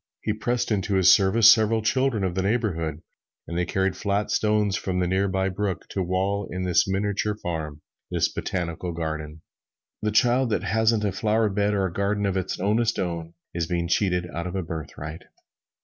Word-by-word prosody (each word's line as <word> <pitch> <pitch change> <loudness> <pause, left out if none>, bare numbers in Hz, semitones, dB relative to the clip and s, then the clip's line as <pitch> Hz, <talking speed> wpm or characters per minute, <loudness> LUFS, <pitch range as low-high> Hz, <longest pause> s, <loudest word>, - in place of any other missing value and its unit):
He 105 - 0
pressed 120 +2 -1
into 100 -1 0
his 95 -2 +6
service 105 +3 +6
several 110 0 +1
children 130 -2 +1
of 95 -2 0
the 95 - -1
neighborhood, 90 -8 -1 0.4
and 85 - -5
they 90 0 0
carried 95 -1 0
flat 100 +2 -1
stones 105 -2 +2
from 95 -1 -2
the 90 - +1
near 95 +2 +1
by 95 0 0
brook 95 -1 -3
to 95 - -2
wall 95 +2 -1
in 90 +1 -4
this 90 -1 +3
miniature 105 +2 -1
farm 80 -6 -5 0.3
this - - +1
botanical 85 -1 -4
garden. 80 -1 -5 0.6
The 105 - 0
child 120 +4 +3
that 110 - 0
hasn't 110 +2 +2
a 100 - +1
flowerbed 105 0 +1
or 100 -1 +1
a 90 - -3
garden 100 +2 0
of 100 -1 0
its 95 -1 -2
ownest 110 +4 +1
own 85 -2 -3 0.2
is 85 -1 -2
being 85 0 -1
cheated 90 -1 +1
out 85 +2 -3
of 90 - -5
its 95 -4 -3
birthright. 80 0 -6
95 Hz, 185 wpm, -25 LUFS, 85-105 Hz, 0.6 s, his